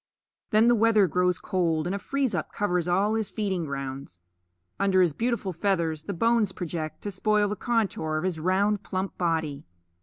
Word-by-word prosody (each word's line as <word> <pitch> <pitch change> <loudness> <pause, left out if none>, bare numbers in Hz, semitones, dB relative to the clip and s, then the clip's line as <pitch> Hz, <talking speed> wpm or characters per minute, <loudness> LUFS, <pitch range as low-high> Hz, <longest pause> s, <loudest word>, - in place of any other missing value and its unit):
Then 215 +2 +4
the 240 - +6
weather 220 -2 +4
grows 180 +1 +1
cold, 165 -4 0
and 180 - -1
a - - -3
freeze 270 0 -1
up 165 -4 -3
covers 180 -4 0
all 195 +4 +2
his 220 -2 -1
feeding 190 -4 -2
grounds. 135 - -6 0.6
Under 190 -2 +4
his 170 -4 +1
beautiful 225 0 -1
feathers 165 -4 0
the 200 - -3
bones 230 0 +2
project 160 -3 -5
to 205 - -3
spoil 210 +2 +2
the 210 - -2
contour 205 -10 -1
of 155 - -2
his 180 -3 -1
round 195 +4 +1
plump 190 -1 -4
body. 160 -5 -1
185 Hz, 180 wpm, -26 LUFS, 165-210 Hz, 0.6 s, the